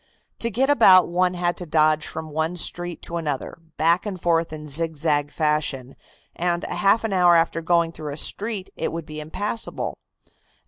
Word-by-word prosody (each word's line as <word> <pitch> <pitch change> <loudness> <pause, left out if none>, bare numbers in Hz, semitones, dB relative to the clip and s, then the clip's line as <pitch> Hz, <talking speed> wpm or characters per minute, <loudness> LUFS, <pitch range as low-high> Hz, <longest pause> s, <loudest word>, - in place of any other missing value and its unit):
To 230 - +2
get 255 +5 +1
about 195 -11 +6
one 180 +1 +1
had 175 0 0
to 180 - -6
dodge 155 0 +2
from 160 -1 -7
one 160 +3 -1
street 175 0 -2
to 170 - -4
another, 150 -1 -4 0.2
back 170 +3 +3
and 190 -3 -5
forth 165 -1 +1
in 150 -1 -8
zigzag 150 -1 0
fashion, 150 -5 -1 0.4
and 175 0 -1
half 205 +3 +1
an 220 -3 -2
hour 175 -2 +5
after 165 0 +1
going 170 0 +2
through 155 -3 -7
a - - -8
street, 205 +2 0
it - - -3
would 165 -1 -5
be 155 0 -8
impassable. 205 +9 -4
170 Hz, 175 wpm, -23 LUFS, 155-180 Hz, 0.4 s, about